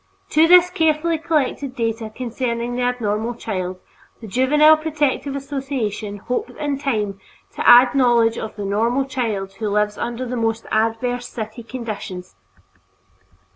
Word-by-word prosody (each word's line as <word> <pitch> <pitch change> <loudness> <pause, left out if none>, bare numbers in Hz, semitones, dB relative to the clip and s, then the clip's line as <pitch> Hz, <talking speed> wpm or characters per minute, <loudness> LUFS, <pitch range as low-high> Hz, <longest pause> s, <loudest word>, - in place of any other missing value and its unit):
To 315 +2 +5
this 360 +1 +7
carefully 320 -1 +1
collected 290 -4 -1
data 225 -2 -2
concerning 235 +1 -3
the 250 - -2
abnormal 235 -2 -1
child, 185 -5 -4 0.4
the 230 - -10
Juvenile 290 +8 +5
Protective 300 -3 -1
Association 265 -7 -4
hopes 250 - -4
in 285 -2 -2
time 210 -8 -2 0.4
to - - +2
add 245 +1 +8
knowledge 240 -4 +3
of 220 - -6
the 205 -1 -5
normal 230 +7 +1
child 220 -8 -3
who 215 - 0
lives 210 0 0
under 240 +2 -3
the 250 0 -4
most 225 -1 -1
adverse 225 +3 0
city 220 0 -7
conditions. 215 - -7
240 Hz, 135 wpm, -21 LUFS, 220-275 Hz, 0.4 s, add